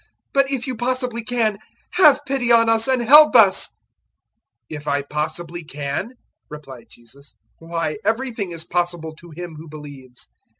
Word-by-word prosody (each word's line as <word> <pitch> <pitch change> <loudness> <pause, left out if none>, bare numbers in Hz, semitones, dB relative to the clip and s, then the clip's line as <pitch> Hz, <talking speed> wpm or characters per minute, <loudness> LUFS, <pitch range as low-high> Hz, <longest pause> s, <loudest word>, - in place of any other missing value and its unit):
But, 275 -1 +2
if 270 -2 -2
you 260 -2 -4
possibly 245 0 -2
can, 225 -4 -1 0.3
have 295 -4 +5
pity 265 -3 0
on 230 -1 +5
us 225 +1 +2
and 260 -2 +1
help 295 +3 +7
us." 200 -5 +5
009:023 - - -23 1.0
"'If 150 +1 -12
I 140 0 0
possibly 165 +4 -4
can!'" 150 - -5 0.4
replied 135 -6 -11
Jesus; 120 +5 -16 0.2
"why, 165 0 -4
everything 225 -2 -2
is 165 -2 -5
possible 175 -2 -3
to 170 +1 -14
him 165 0 -9
who 160 0 -11
believes." 140 -4 -12
175 Hz, 155 wpm, -20 LUFS, 150-245 Hz, 1.0 s, help